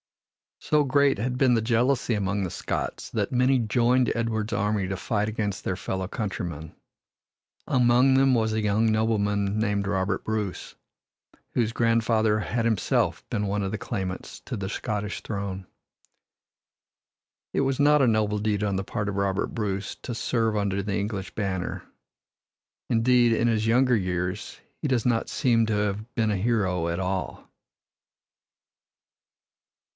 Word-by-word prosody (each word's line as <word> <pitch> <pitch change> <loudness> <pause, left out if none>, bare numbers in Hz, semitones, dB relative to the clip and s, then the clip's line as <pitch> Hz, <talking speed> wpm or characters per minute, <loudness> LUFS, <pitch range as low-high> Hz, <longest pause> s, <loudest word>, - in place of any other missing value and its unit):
So 150 -1 +2
great 140 0 +3
had 125 +4 -2
been 130 -1 +4
the 115 - +2
jealousy 120 +2 +1
among 100 -1 -1
the 90 - -2
Scots - - -4
that - - -1
many 125 +1 +3
joined 120 +2 +2
Edward's 115 -1 -1
army 105 -3 0
to 95 0 -3
fight 105 +1 -1
against 105 -2 -3
their 90 - -1
fellow 95 0 -3
countrymen. 85 -7 -5 0.9
Among 125 +1 +4
them 135 0 +4
was 110 -2 +1
a 110 - 0
young 110 +2 +2
nobleman 105 -2 +1
named 100 -2 0
Robert 95 -1 -1
Bruce, 105 -4 -3 0.8
whose 115 -2 0
grandfather 115 -2 +2
had 115 +2 -1
himself 110 -5 0
been 105 - -1
one 100 +1 -1
of 95 - -2
the 110 - -2
claimants 95 -5 -5
to - - -6
the 95 -1 -4
Scottish 105 -2 -3
throne. 100 -3 -5 1.9
It - - +1
was 135 0 0
not 150 0 +5
a 130 - +4
noble 105 -2 +1
deed 105 -1 0
on 100 -2 0
the 95 - -2
part 105 +1 -3
of 100 - -4
Robert 100 0 0
Bruce 100 -3 -3
to 120 - -4
serve 115 -1 0
under 100 -1 0
the 100 0 -2
English 100 -2 -3
banner. 95 -4 -3 1.1
Indeed, 120 0 +4
in 115 +1 +2
his 110 -1 +1
younger 125 +2 +4
years 90 0 -3 0.2
he 150 - -3
does 125 -5 +1
not 115 -2 +1
seem 115 -5 +2
to 110 - 0
have 105 +2 -2
been 110 -2 +1
a 100 - 0
hero 95 -5 0
at 85 +1 -2
all. 95 0 -3
110 Hz, 150 wpm, -26 LUFS, 100-120 Hz, 1.9 s, not